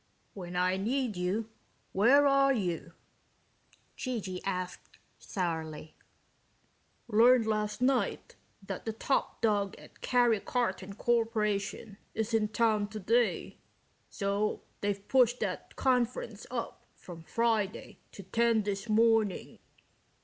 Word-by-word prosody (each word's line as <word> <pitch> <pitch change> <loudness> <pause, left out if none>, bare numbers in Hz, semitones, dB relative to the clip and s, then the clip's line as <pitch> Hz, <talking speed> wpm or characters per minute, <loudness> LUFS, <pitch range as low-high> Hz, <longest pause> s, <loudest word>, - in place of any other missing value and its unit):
"When 180 -2 -7
I 180 +1 +2
need 240 +2 -1
you, 195 +5 -2 0.4
where 255 +9 +5
are 275 0 +4
you?" 175 -8 -2 1.0
G.G. 205 -8 -4
asked 185 -2 -5 0.2
sourly. 160 -4 -4 1.1
"Learned 235 +2 +5
last 215 +1 -1
night 260 0 0 0.3
that 195 -1 -6
the 225 - -2
top 265 +5 -1
dog 205 -3 +1
at - - -16
Karry 240 -4 +3
Karton 205 -6 -2
Korporation 215 -3 0 0.2
is 225 +1 -2
in 220 -1 +3
town 215 -1 +1
today, 220 +3 0 0.5
so 200 +1 -1 0.2
they've 200 -1 -2
pushed 250 -2 +4
that - - -4
conference 240 -4 0
up 240 -2 -5
from 170 -2 -11
Friday 220 +2 -1
to 195 - -9
ten 230 +3 +2
this 200 +2 -3
morning. 220 -2 +2
215 Hz, 110 wpm, -30 LUFS, 195-235 Hz, 1.1 s, where